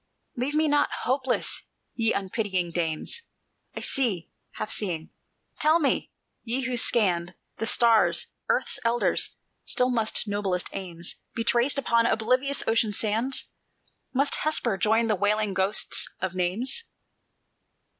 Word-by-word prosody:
"Leave 260 +5 -2
me 310 0 +3
not 290 0 +3
hopeless, 260 0 0 0.3
ye 225 -1 +1
unpitying 190 -3 -1
dames! 165 - -1 0.5
I - - -5
see, 220 -11 -1 0.2
half 215 - -4
seeing. 170 -6 -3 0.5
Tell 310 +2 +5
me, 295 -5 0 0.3
ye 245 +3 0
who 255 -1 -2
scanned 185 -7 +1 0.2
The 225 - -2
stars, 230 -1 +4 0.2
Earth's - - +1
elders, 235 +1 +1 0.3
still 250 0 +1
must 225 -2 0
noblest 200 -3 -1
aims 175 -3 -3 0.2
Be 230 - -1
traced 240 +5 +2
upon 235 -4 +3
oblivious 255 +5 +1
ocean 225 -2 +2
sands? 225 +6 0 0.6
Must 275 +2 +1
Hesper 280 -8 +1
join 220 +3 +2
the 220 - +2
wailing 205 +1 +1
ghosts 190 +3 +1
of 185 -1 -2
names?" 210 - -1
225 Hz, 125 wpm, -26 LUFS, 190-255 Hz, 0.6 s, Tell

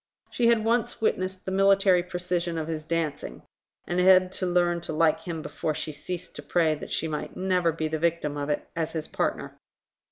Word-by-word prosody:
She 240 - +2
had 230 -2 +3
once 230 0 +1
witnessed 185 -3 -1
the 190 - -3
military 195 -1 +4
precision 175 -1 -2
of 160 -1 -3
his 160 -1 -4
dancing, 155 - -3 0.4
and 175 +1 -1
had 185 0 +6
to 185 -1 -2
learn 175 -1 +2
to - - -5
like 160 0 +2
him 165 -3 -4
before 155 +1 -3
she 155 - -3
ceased 175 +4 -6
to - - -6
pray 165 -3 +2
that 150 - -7
she 160 - 0
might 150 -1 -5
never 185 -2 +2
be 160 0 -2
the 155 0 -2
victim 165 -3 0
of 145 0 -3
it 150 - -2
as 165 -1 -2
his 160 -2 -3
partner. - - -3
170 Hz, 200 wpm, -26 LUFS, 155-185 Hz, 0.4 s, had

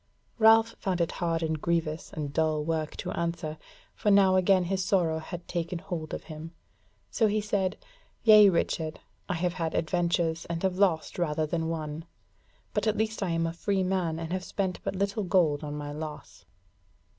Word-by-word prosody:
Ralph 225 +1 +6
found 185 -2 -1
it 170 - +1
hard 165 -2 -1
and 160 -1 -1
grievous 165 -2 -1
and 145 -2 -5
dull 155 -1 +1
work 160 -1 -2
to - - -4
answer; 170 -2 -3 0.3
for 210 - 0
now 195 -2 +6
again 185 0 +4
his 190 +1 -1
sorrow 170 -5 +1
had 175 +2 -8
taken 170 0 -2
hold 165 -3 -5
of - - -5
him: 160 +1 -9 0.6
so 225 - +3
he 215 +1 +1
said: 200 -3 -1 0.5
"Yea, 215 -2 +9
Richard, 160 -3 -1 0.3
I 185 - 0
have 175 +1 0
had 165 -3 -3
adventures, 170 0 0
and 170 +1 -4
have 190 -1 0
lost 180 -4 +1
rather 155 -2 0
than 160 +1 -2
won; 155 -1 -4 0.7
but - - 0
at 215 - +1
least 220 +1 -1
I 195 - 0
am 165 0 +1
a 165 - -2
free 190 +2 0
man, 180 -4 0
and 165 +1 -4
have 185 0 -2
spent 190 -1 -2
but - - -3
little 200 +2 -1
gold 165 -5 +2
on 145 0 -4
my 145 0 -5
loss." 150 0 -8
170 Hz, 185 wpm, -28 LUFS, 160-190 Hz, 0.7 s, Yea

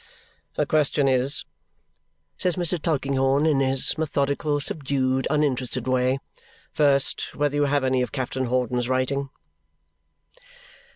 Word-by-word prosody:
"The - - +1
question 150 -2 +1
is," 130 +1 +1 0.9
says 180 -2 0
Mr. 175 -2 -1
Tulkinghorn 140 -2 +1
in 150 -4 +3
his 135 +2 +2
methodical, 145 -1 0
subdued, 130 -3 -1
uninterested 130 -4 0
way, 130 +1 +2 0.5
"first, 140 -2 +1
whether 145 0 0
you 145 0 +2
have 140 -1 +1
any 130 -1 +1
of 125 - -2
Captain 130 -1 -2
Hawdon's 125 0 -1
writing?" 135 +2 0
135 Hz, 115 wpm, -24 LUFS, 130-145 Hz, 0.9 s, in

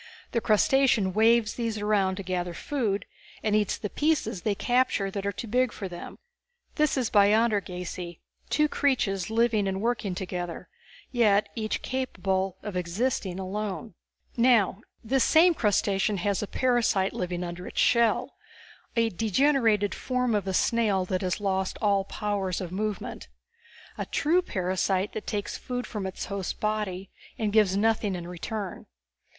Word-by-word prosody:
The 235 - 0
crustacean 220 -2 +3
waves 225 +1 +4
these 230 -2 -2
around 205 -2 +1
to 195 - -6
gather 180 -1 -3
food, 225 -9 -1 0.4
and 215 -1 +2
eats 210 -2 +1
the 210 - -4
pieces 275 - 0
they 210 +1 0
capture 245 -4 +1
that 200 0 -3
are - - +1
too 200 - -6
big 250 +2 +2
for 195 - -6
them. 175 -1 -9 0.6
This 300 -2 +1
is 245 -4 0
biontergasy, 200 -5 +1 0.3
two 300 0 +3
creatures 220 - 0
living 220 -2 +2
and 190 0 -1
working 220 -4 -1
together, 180 -2 -5 0.4
yet 210 -4 +3
each 215 -2 -3
capable 195 -7 -1
of 210 -3 -5
existing 185 +2 -1
alone. 200 +2 -4 0.4
"Now, 230 -5 +3 0.2
this 255 +2 +2
same 340 +2 +6
crustacean 205 -4 +1
has 200 +2 0
a 210 - -3
parasite 235 -7 +1
living 180 -1 -3
under 175 +1 -6
its - - -4
shell, 235 -2 +3 0.6
a 230 -1 +3
degenerated 225 0 +2
form 250 -2 -1
of 205 -2 0
a 190 - -1
snail 210 -5 +2
that 185 0 -1
has 185 +1 -1
lost 190 -2 -1
all 200 -2 +2
powers 200 -3 -2
of 180 -2 -5
movement. 205 - -4 0.7
A - - -3
true 335 +5 +2
parasite 190 - -1
that 215 - -6
takes 205 -2 -3
food 250 0 -4
from 205 -4 -4
its 190 - -5
host's 200 -2 -3
body 210 -3 -3 0.3
and 210 -2 -1
gives 205 -3 +4
nothing 215 -2 +1
in 175 -1 -6
return. 185 +3 -5
205 Hz, 150 wpm, -27 LUFS, 190-230 Hz, 0.7 s, same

